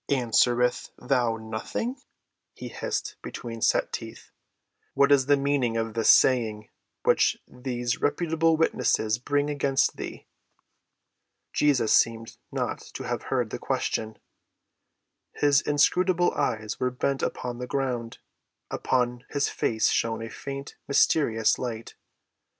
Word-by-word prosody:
"Answerest 125 -1 +2
thou 120 -4 0
nothing?" 110 - -4 0.5
he - - -7
hissed - - -4
between 115 -2 -7
set - - +2
teeth. - - -7 0.6
"What 140 0 +4
is 135 -2 +4
the 145 0 +5
meaning 135 -4 0
of 115 -1 -2
this 115 0 +1
saying 110 -5 +4 0.3
which - - +3
these 125 -1 -3
reputable 165 +1 +1
witnesses 110 -8 +1
bring 145 +3 0
against 140 -2 +1
thee?" - - -7 1.3
Jesus 140 -7 +3
seemed 115 0 +1
not - - -2 0.2
to - - -5
have - - -3
heard - - 0
the - - -4
question. 110 -1 -2 1.2
His 145 0 +3
inscrutable 175 +5 +2
eyes 110 -6 -2
were 125 - +1
bent 135 +2 -2
upon 120 -1 -3
the 125 - -5
ground; 125 -4 -2 0.5
upon 125 -1 0
his 145 -1 0
face 110 -2 +1
shone 115 0 0
a 115 - -7
faint, 140 +3 -7
mysterious 130 -5 +3
light. 115 -3 -5
125 Hz, 120 wpm, -26 LUFS, 115-145 Hz, 1.3 s, the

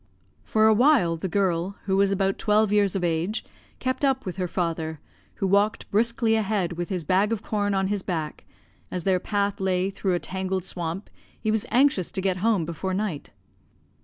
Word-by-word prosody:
For 215 0 +2
a 220 - +6
while 235 - +4
the 165 +3 -4
girl, 185 0 0
who 190 -1 +1
was 200 0 +3
about 195 0 0
twelve 210 -1 +3
years 205 -2 +3
of 190 - -1
age, 170 +5 -1 0.3
kept 260 +2 -2
up 265 -1 +1
with 185 -1 -5
her 180 -1 -1
father, 165 -3 -2 0.4
who - - -2
walked 205 +3 +1
briskly 230 +1 +2
ahead 210 -5 0
with 175 0 -4
his 185 -4 -2
bag 190 +7 +2
of 220 -2 -2
corn 205 -2 0
on 195 0 +1
his 200 0 -1
back, 160 -5 -4 0.5
for, - - -6
as 180 - -3
their 185 0 +2
path 200 +1 -1
lay 190 0 0
through 190 -2 -1
a - - 0
tangled 190 0 -3
swamp, 175 +2 -4 0.3
he 215 - 0
was 220 -1 0
anxious 245 - +3
to - - -2
get 190 -1 0
home 205 -3 +1
before 185 +3 -3
night. 190 -7 -3
195 Hz, 195 wpm, -25 LUFS, 180-210 Hz, 0.5 s, a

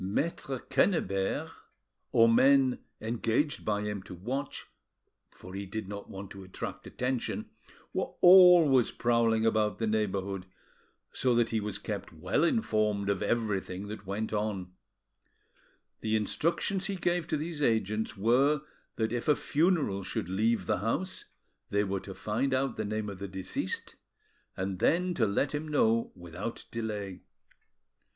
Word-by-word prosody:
Maitre 135 - -2
Quennebert, 120 - 0 0.6
or 115 - +6
men 130 +2 +5 0.2
engaged 115 +6 0
by 105 -1 0
him 105 -2 -3
to 95 -1 -10
watch, 130 +10 -4 0.6
for 90 - -12
he 100 0 -5
did 110 +1 -5
not 100 0 -7
want 95 0 -8
to 100 - -9
attract 95 -1 -7
attention, 125 -1 -2 0.4
were - - -2
always 175 -8 +8
prowling 115 -1 +2
about 110 -1 +2
the 115 - -1
neighbourhood, 100 -3 -1 0.7
so 125 -2 +2
that 120 -1 +3
he 110 - 0
was 105 -1 -3
kept 105 -4 -5
well 90 - 0
informed 110 - +1
of 100 - -2
everything 105 -4 -1
that 105 -2 -8
went 105 +3 -3
on: 105 -4 -2 1.3
The 110 0 0
instructions 170 - 0
he 200 - -2
gave 175 -2 0
to 155 - 0
these 155 0 -4
agents 110 -3 0
were, 135 +8 +3 0.3
that 110 0 -1
if 120 - -3
a 150 - +5
funeral 150 - +1
should 90 - -3
leave 105 +1 +1
the - - 0
house, 115 - -2 0.4
they 100 0 +2
were 100 -1 -1
to 95 0 -9
find 130 +5 0
out 135 +1 0
the 110 - -3
name 110 0 -2
of 100 -2 -7
the 100 - -4
deceased, 95 0 -4 0.6
and 95 -1 -3
then 180 +2 +2
to 115 -9 +2
let 120 +9 0
him 150 +1 -3
know 115 -6 +2
without 90 +5 -6
delay. 105 -5 -4
110 Hz, 145 wpm, -30 LUFS, 100-135 Hz, 1.3 s, always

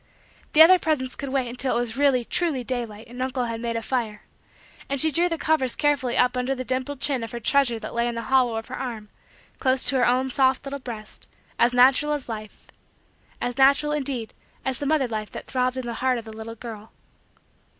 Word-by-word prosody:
The 315 - +9
other 365 +3 +7
presents 275 -6 -1
could 280 - -5
wait 260 -2 0
until 250 +2 -1
it - - +2
was 240 -2 -2
really, 270 -3 +2
truly, 310 -6 0
daylight 235 -3 -4
and 245 +2 -8
uncle 255 -1 -1
had 230 -1 -4
made 235 -1 -2
a 230 - -2
fire; 225 -5 -2 0.7
and 280 0 -1
she 315 +3 +2
drew 345 +4 +2
the 330 - -2
covers 310 -7 +1
carefully 290 -4 +1
up 250 0 +3
under 250 +2 -1
the 255 - -4
dimpled 260 +2 -2
chin 270 -4 0
of 225 - -5
her 240 - -4
treasure 245 0 +2
that 225 - -7
lay 235 0 +1
in 240 - -3
the 230 - -4
hollow 250 -1 +2
of 225 0 -4
her 255 - -5
arm, 225 -5 -5 0.5
close 260 0 +2
to 270 - +2
her 250 - +3
own 255 +2 +1
soft 265 +1 +2
little 280 0 -5
breast, 230 -5 -8 0.3
as 240 +1 +3
natural 265 +4 +5
as 290 -3 -4
life 215 -2 -8 0.7
as 245 +2 -3
natural, 280 +2 +5
indeed, 270 -6 -3 0.3
as 260 -2 -1
the 285 - -2
mother 295 -3 +2
life 215 -2 -4
that - - -7
throbbed 255 0 -1
in 260 - -3
the 235 - -4
heart 255 +1 0
of 230 - -7
the 220 - -9
little 220 +1 -8
girl. 220 -2 -9
255 Hz, 225 wpm, -24 LUFS, 235-275 Hz, 0.7 s, The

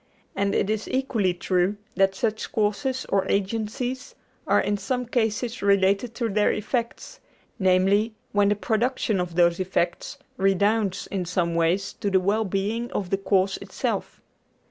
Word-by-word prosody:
And 200 0 0
it - - +1
is 215 0 -2
equally 240 -8 +1
true 185 +3 0 0.2
that 195 +1 +2
such 220 +1 -2
causes 240 +5 0
or 195 -1 +1
agencies 225 +5 -2 0.3
are - - +4
in 205 - 0
some 250 +4 -2
cases 230 0 -1
related 200 +3 +2
to 235 - -1
their 210 0 +2
effects, 235 - -3 0.4
namely, 195 +4 +3 0.2
when 205 0 +3
the 205 - +2
production 220 -2 0
of 175 -2 -5
those 170 0 +3
effects 180 -2 -1 0.2
redounds 195 +1 +1
in 190 -3 -3
some 175 -1 0
way 165 +2 +3
to 200 +1 -4
the 190 -1 +4
well 205 +4 +1
being 210 +5 -2
of 190 -3 -3
the 195 - +2
cause 195 -1 +1
itself. - - -4
200 Hz, 150 wpm, -25 LUFS, 190-225 Hz, 0.4 s, are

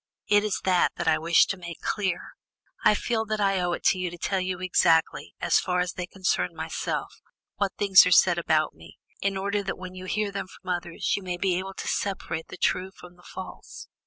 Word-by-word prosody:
It 205 0 +4
is 210 -3 -1
that 185 -2 +3
that 175 - -4
I - - +4
wish 165 +1 +5
to 190 - -3
make 170 -2 -8
clear; 190 -4 -2 0.5
I 210 - +5
feel 225 +1 -1
that 215 0 -2
I 195 -2 +2
owe 175 -1 0
it - - -5
to 185 - +3
you 180 -1 -1
to 175 - -9
tell 190 +3 -1
you 185 -1 -3
exactly, 170 -3 +2
as - - +3
far 180 -1 -1
as 180 0 -1
they 180 -1 -5
concern 185 -1 -1
myself, - - -4 0.4
what 200 -2 0
things 200 -2 +7
are - - 0
said 175 0 +5
about 155 -2 +1
me, - - -15 0.2
in 195 0 0
order 200 +1 -1
that 195 -1 -4
when 185 0 -8
you 185 0 -8
hear 210 +2 -1
them 195 -1 -4
from 185 -1 -8
others, 175 -1 -1
you 200 - -4
may 180 -2 -4
be 185 0 +1
able 190 +1 -6
to - - -6
separate 190 -4 -2
the - - -10
true 185 +1 0
from 180 -2 -15
the 175 - -21
false. 190 - -9
185 Hz, 225 wpm, -26 LUFS, 175-195 Hz, 0.5 s, things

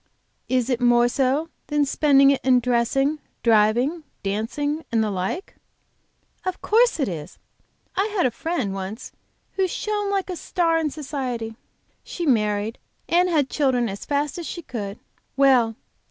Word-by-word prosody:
"Is 255 0 +1
it 245 0 0
more 240 0 +5
so 275 +5 0 0.2
than 295 -1 +2
spending 275 -1 +5
it 275 - 0
in 255 -1 +5
dressing, 250 +5 +1 0.2
driving, 235 +8 +3 0.2
dancing, 290 +10 -2
and 225 -1 +2
the 210 - -1
like?" 190 - -3 0.9
"Of 370 -1 -3
course 465 -3 +3
it 275 - +1
is. 160 -6 -6 0.6
I 390 +2 +2
had 360 - +3
a 255 - +2
friend 295 - -2
once 195 +4 -6 0.4
who 385 -1 0
shone 415 +2 -2
like 390 -2 -1
a - - -3
star 335 -1 +1
in 315 -2 0
society. 260 -6 -4 0.5
She 345 - -5
married, 210 -4 +1 0.3
and 340 -5 +3
children 260 -5 +1
as 195 +1 -6
fast 290 +3 -1
as 340 - -5
she 345 - -6
could. 205 -6 -5 0.4
Well! 255 -5 +4
270 Hz, 150 wpm, -23 LUFS, 230-320 Hz, 0.9 s, more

